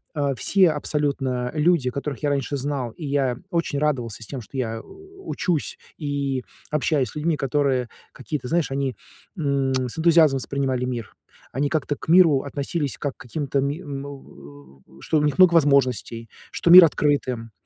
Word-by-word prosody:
а, 140 -2 0
все 185 +6 +3
абсолютно 140 -4 -2
люди, 155 -4 +2
которых 140 0 -5
я 145 - +2
раньше 140 0 -1
знал, 135 -2 -3
и 160 - -8
я 135 -3 0
очень 170 -4 -1
радовался 125 -7 -2
с - - -10
тем, 135 -3 -6
что 125 +5 -10
я, 115 -3 -2
э, - - -7
учусь 385 - -4 0.2
и 140 -4 -2 0.3
общаюсь 145 -3 +1
с - - -13
людьми, 155 +2 0
которые 135 -2 0 0.2
какие-то, 130 +1 -5
знаешь, 165 -1 0
они, 135 -2 -2 0.4
м, 140 -4 0
с 130 +3 -2
энтузиазмом 160 -4 +5
воспринимали 130 -2 -2
мир. 120 -4 -5 0.4
Они 140 +2 -1
как-то 150 -2 -1
к - - -12
миру 165 -6 +6
относились, 140 +1 -3
как 145 -2 -4
к - - -62
каким-то, 140 +2 -2
ми 145 +7 -3 0.2
му 70 - -12 0.2
э, - - -16
что 155 - 0
у - - 0
них 150 -1 0
много 185 -2 +6
возможностей, 130 - +2 0.2
что - - -1
мир 180 0 +12
открыт 145 -3 +1
им. 115 -3 -5
140 Hz, 175 wpm, -23 LUFS, 130-150 Hz, 0.4 s, мир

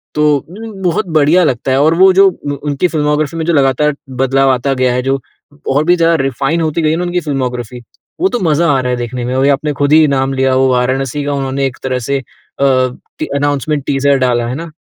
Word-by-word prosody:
तो 150 - +2
उ, 200 - -10
बहुत 180 +3 0
बढ़िया 160 +5 +4
लगता 130 -2 -1
है। 130 - +2
और 160 +2 +3
वो 190 0 +6
जो 195 +1 +6
उ 145 - -7
उनकी 145 +4 0
फ़िल्मोग्राफ़ी 150 0 -1
में 160 - -2
जो 170 - +1
लगातार 140 +1 +2 0.3
बदलाव 135 +1 +2
आता 130 +2 0
गया 130 -1 +1
है, 125 - 0
जो 135 +1 0 0.5
और 145 +3 +2
भी 175 - +4
ज्यादा 165 0 +3
रिफाइन 135 +5 -1
होती 160 +1 -1
गयी 155 - +2
है 160 - 0
ना 180 - -2
उनकी 180 0 -1
फ़िल्मोग्राफ़ी। 125 -6 -4 0.4
वो 380 - +3
तो 245 - -2
मज़ा 165 +3 +2
आ 135 - +2
रहा 125 0 -2
है 125 - -1
देखने 120 +1 -4
में। 125 - -3
या 140 - +4
आपने 150 +1 -2
खुद 145 +1 +2
ही 155 0 +6
नाम 135 -1 0
लिया, 130 -1 +1
वो 130 0 +3
वाराणसी 130 +3 -1
का 145 - -1
उन्होंने 135 0 -2
एक 125 - -8
तरह 130 -1 -1
से 140 0 +1 0.4
अ, 140 - +2 0.7
अनाउंसमेंट 145 0 -1
टीजर 140 0 +1
डाला। 120 -2 +1
है 125 - -3
ना? 165 +1 -7
140 Hz, 230 wpm, -14 LUFS, 130-160 Hz, 0.7 s, वो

